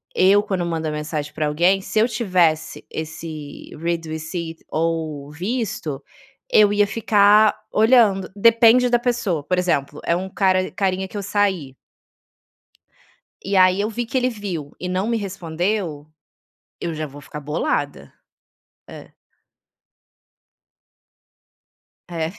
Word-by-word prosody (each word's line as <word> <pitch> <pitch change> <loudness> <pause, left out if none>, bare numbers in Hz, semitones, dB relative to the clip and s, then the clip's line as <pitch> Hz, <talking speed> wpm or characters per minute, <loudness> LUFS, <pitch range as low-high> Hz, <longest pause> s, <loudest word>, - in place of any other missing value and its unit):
eu, 200 +2 +5
quando 185 -4 -2
mando 165 -2 -2
a - - -2
mensagem 150 -1 -4
pra 155 -1 -1
alguém, 175 +6 +2
se 210 - -5
eu 225 - +4
tivesse 185 -9 0
esse 155 -2 -7
read 165 +1 -2
receipt 160 +1 -6
ou 155 -3 -2
visto, 185 - -4 0.5
eu 210 -1 +6
ia 205 0 +3
ficar 210 0 +4 0.2
olhando. 215 -4 +4
Depende 230 +3 +5
da 240 -1 +3
pessoa, 230 - -1
por 180 +5 -1
exemplo, 150 -5 -1
é 170 - +2
um 185 +2 -4
cara 185 -1 +1
carinha 190 -1 -1
que 205 - -8
eu 200 - -4
saí. 190 -9 -1 1.7
E 195 +1 -1
aí 185 +1 +5
eu 210 +2 -1
vi 240 +2 -3
que 245 - -4
ele 255 0 +2
viu 185 - -6
e 180 - -4
não 185 +2 -1
me 230 0 0
respondeu, 180 -4 -3 0.7
eu 170 - -3
já 155 0 -4
vou 145 +1 -12
ficar 150 - -8
bolada. 145 - -3 0.8
É. - - -11 3.0
É. 165 -2 -3
185 Hz, 130 wpm, -21 LUFS, 160-205 Hz, 3.0 s, eu